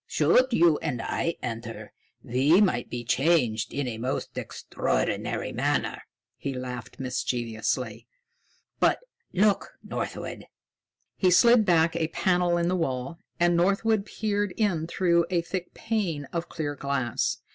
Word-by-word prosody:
Should 255 +1 +4
you 170 -7 +4
and 145 -7 -3
I 165 +8 -1
enter, 115 -1 -6 0.3
we 135 +9 +4
might 125 - +2
be 120 -1 -4
changed 125 -5 +2
in 140 -2 -2
a 110 -2 -4
most 125 +3 -3
extraordinary - - -2
manner." - - -1 0.4
He 135 -1 -4
laughed 125 -2 -6
mischievously. 120 -3 -2 0.7
"But, - - +4 0.3
look, 205 - +1
Northwood!" - - -5 0.7
He 185 - +3
slid 235 +4 +6
back 165 -2 +3
a 165 -2 0
panel 175 +1 +1
in 170 0 +1
the 180 - +1
wall, 135 -1 -2 0.2
and 175 0 +4
Northwood 200 +4 +2
peered 205 -3 -1
in 175 -7 +1
through 170 -1 +2
a 175 -2 +1
thick 180 +1 -5
pane 190 -10 -2
of 170 0 -3
clear 150 -3 -3
glass. 140 -4 -1
165 Hz, 135 wpm, -27 LUFS, 130-185 Hz, 0.7 s, slid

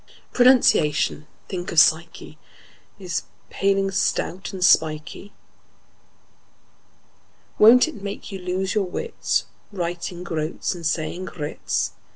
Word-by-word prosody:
Pronunciation—think 180 - +2
of 170 - +4
psyche!— 165 +2 +1 0.6
Is 185 -3 -3
a - - -28
paling, 195 0 +1
stout 190 -1 -1
and 185 -2 0
spikey; 155 +4 +1 2.3
Won't 235 +6 +7
it 225 -11 -9
make 200 +1 -7
you 195 - -6
lose 185 +1 -2
your 210 -3 +1
wits, 460 - -2 0.3
Writing 175 -1 -4
"groats" 160 0 -3
and 170 -3 -4
saying 165 +3 -3
groats? 95 - -3
180 Hz, 105 wpm, -23 LUFS, 160-195 Hz, 2.3 s, Won't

